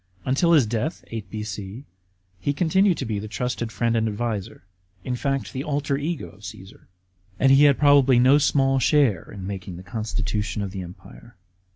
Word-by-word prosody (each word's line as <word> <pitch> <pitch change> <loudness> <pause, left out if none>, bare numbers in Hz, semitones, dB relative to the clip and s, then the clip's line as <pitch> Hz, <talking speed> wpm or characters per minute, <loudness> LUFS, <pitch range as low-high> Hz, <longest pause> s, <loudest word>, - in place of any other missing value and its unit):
Until 170 +6 +2
his 145 -7 +5
death, 120 +9 -3
(8 110 -4 -6
B.C.) 105 +3 -6 0.5
he 145 - -1
continued 185 +4 +2
to 135 - -3
be 110 -3 -2
the 105 - -6
trusted 120 +2 -3
friend 115 +4 0
and 115 0 +1
adviser, 105 -2 -4 0.4
in 125 - -2
fact, 135 +1 -2
the 130 - -3
alter 145 -1 -1
ego 150 +3 -3
of 105 +1 -20
Caesar; 95 -2 -11 0.5
and 135 - +4
he 140 +2 +7
had 140 -2 +5
probably 140 -3 +5
no 130 +4 +5
small 135 -2 +2
share 130 - +2
in 95 -3 -8
making 95 -2 -6
the 90 - -10
constitution 105 0 -3
of 100 - -5
the 95 -1 -5
Empire. 90 0 -13
120 Hz, 180 wpm, -24 LUFS, 105-140 Hz, 0.5 s, he